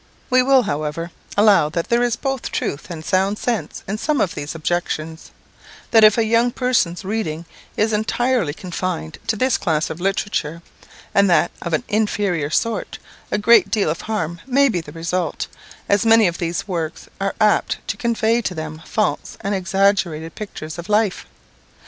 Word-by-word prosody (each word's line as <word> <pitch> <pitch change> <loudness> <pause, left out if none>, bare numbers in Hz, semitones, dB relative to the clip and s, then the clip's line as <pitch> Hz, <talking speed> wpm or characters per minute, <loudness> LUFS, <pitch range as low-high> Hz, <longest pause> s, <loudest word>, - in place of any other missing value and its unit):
We 255 0 +6
will, 265 0 +4
however, 155 +2 -3 0.3
allow 205 -7 +5
that 165 +2 -3
there 235 +1 +3
is 240 -2 +1
both 270 0 -3
truth 140 - -3
and 160 -3 -7
sound 195 +2 +1
sense 235 -1 -3
in 210 +2 -3
some 300 +1 0
of 185 - +1
these 145 +2 -5
objections; 160 -1 -3 0.6
that 225 -1 +6
if 215 +1 +7
a 230 - +3
young 230 +2 +3
person's 240 -9 0
reading 185 -6 -3 0.3
is 215 +1 +2
entirely 225 - +1
confined 180 - -4
to 220 - +1
this 255 +3 +1
class 160 -1 0
of 160 - -7
literature, 180 -4 -1 0.5
and 200 -1 +4
that 175 - +3
of 170 - -4
an 155 - +1
inferior 205 -7 0
sort, 230 +8 -1 0.3
a - - 0
great 210 -2 +5
deal 200 -6 +1
of 165 - -4
harm 175 -6 -3
may 275 +1 +4
be 180 -7 -1
the - - -11
result, 170 0 -2 0.4
as 200 -1 +3
many 225 -1 +6
of 170 0 -3
these 170 +3 -2
works 165 -4 -4
are 195 0 -1
apt 215 -1 +3
to - - -1
convey 230 0 +1
to 185 -5 -3
them 155 0 -6
false 215 - -1
and 200 0 -1
exaggerated 190 -4 +1
pictures 170 -6 -7
of 170 - -8
life. 210 -2 +1
195 Hz, 175 wpm, -20 LUFS, 165-220 Hz, 0.6 s, if